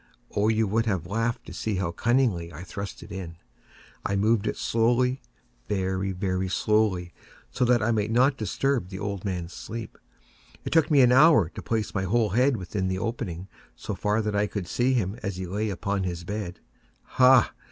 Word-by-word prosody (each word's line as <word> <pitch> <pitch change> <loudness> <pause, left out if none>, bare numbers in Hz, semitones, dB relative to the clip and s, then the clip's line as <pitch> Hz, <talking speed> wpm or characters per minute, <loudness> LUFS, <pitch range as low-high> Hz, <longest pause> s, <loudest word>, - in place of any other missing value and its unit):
Oh, 105 +1 +2
you 110 0 +2
would 110 +3 0
have 95 -6 -1
laughed 115 +5 -2
to - - -9
see 110 -2 -2
how 90 -3 -1
cunningly 115 -5 +1
I 80 +3 -9
thrust 100 +2 -7
it - - -12
in! 90 -3 -6 0.7
I 100 - -1
moved 110 +2 +2
it - - -2
slowly—very, 100 - -1
very 95 0 -1
slowly, 95 -4 +1 0.4
so 125 - +1
that 120 -2 +3
I 115 - +2
might 105 -2 0
not 130 +4 +3
disturb 120 -1 -1
the 95 - -7
old 100 -1 -4
man's 90 -4 -4
sleep. 115 0 -7 0.7
It - - -3
took 160 -2 +4
me 145 -3 +5
an 125 -1 +6
hour 130 - +6
to - - -9
place 110 -2 -2
my 95 -1 -1
whole 110 +3 +2
head 125 +4 +3
within 95 0 -3
the 95 0 -1
opening 95 -5 -4 0.3
so - - -5
far 105 +2 0
that 105 -1 -2
I 105 +1 +2
could 100 -3 -5
see 125 +7 +1
him 105 -1 -1
as 100 -3 -3
he 95 0 -4
lay 105 +4 -2
upon 100 +1 -2
his 85 -2 -4
bed. 100 -1 -5 0.4
Ha! 130 -2 +5
105 Hz, 190 wpm, -26 LUFS, 95-115 Hz, 0.7 s, an